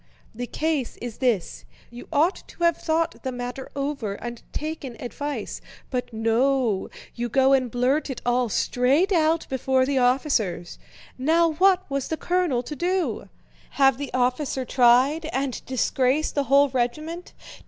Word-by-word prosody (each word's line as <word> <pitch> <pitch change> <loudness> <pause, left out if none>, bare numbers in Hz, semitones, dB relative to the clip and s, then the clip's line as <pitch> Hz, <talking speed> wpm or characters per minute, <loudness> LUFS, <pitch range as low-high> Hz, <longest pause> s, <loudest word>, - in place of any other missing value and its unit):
The 245 +2 -5
case 305 -2 -2
is 240 -2 -7
this: 200 - 0 0.3
you 240 0 -10
ought 325 +5 +2
to 345 - -8
have 340 -1 +4
thought 325 0 -1
the 260 - -3
matter 245 +1 -6
over 275 -7 -3
and 240 +2 -7
taken 300 -6 -5
advice; 285 +4 -5 0.3
but 250 -1 -3
no, 230 -1 +1 0.2
you 240 0 -3
go 265 +2 +4
and 260 -2 +2
blurt 255 +6 0
it 265 - -4
all 245 0 +1
straight 270 - +2
out 325 -2 +2
before 265 0 +1
the 270 0 +1
officers. 245 - 0 0.4
Now 325 +5 +3
what 375 +3 +3
was 275 -2 -2
the 320 - -3
colonel 345 -10 0
to 300 - -6
do? 360 +4 -1 0.5
Have 270 -2 +4
the 285 - -5
officer 255 +1 0
tried 255 +6 +4
and 265 -3 -2
disgrace 260 +3 +1
the 285 -1 -1
whole 280 +1 +5
regiment? 305 +8 -3
265 Hz, 150 wpm, -24 LUFS, 245-310 Hz, 0.5 s, whole